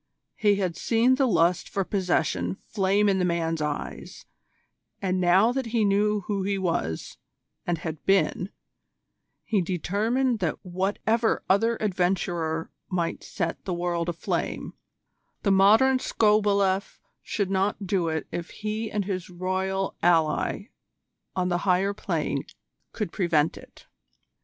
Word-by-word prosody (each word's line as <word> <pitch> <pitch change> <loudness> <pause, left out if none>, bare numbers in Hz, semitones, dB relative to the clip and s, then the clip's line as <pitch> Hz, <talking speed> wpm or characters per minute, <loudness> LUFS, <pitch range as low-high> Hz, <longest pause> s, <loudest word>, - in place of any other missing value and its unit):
He 205 -2 +3
had 185 -4 -1
seen 235 +2 +3
the 265 0 +2
lust 175 -4 +2
for 195 - -1
possession 170 - 0
flame 200 0 +2
in 195 -1 +2
the - - +1
man's 165 -2 0
eyes, 150 -1 -5 0.7
and 185 -1 0
now 185 +6 +5
that 260 -1 -2
he 225 -2 +1
knew 205 +1 +2
who 200 +1 -2
he 195 +1 0
was 165 - -2 0.5
and 175 -1 +1
had 160 -1 -6
been 195 -1 +2 0.9
he 210 -4 +1
determined 215 +8 0
that 175 -5 -1
whatever 205 +5 0
other 225 +4 +3
adventurer 175 -4 -1 0.2
might 175 -3 -2
set 170 -4 -3
the 180 - -2
world 175 -1 -1
aflame, 170 -1 -3 0.7
the 200 - +3
Modern 220 +7 +5
Skobeleff 200 -4 +2 0.2
should 200 -3 -2
not 195 +1 0
do 185 -3 0
it 160 -1 -2
if 175 0 -4
he 215 +1 -4
and 205 -2 -2
his 185 -2 -4
Royal 190 +2 -2
ally 170 +5 +2 0.7
on 185 -1 0
the 175 -1 +1
Higher 190 +1 +2
Plane 200 - -2 0.5
could 210 -7 -3
prevent 165 -5 +1
it. - - -15
190 Hz, 135 wpm, -26 LUFS, 175-210 Hz, 0.9 s, now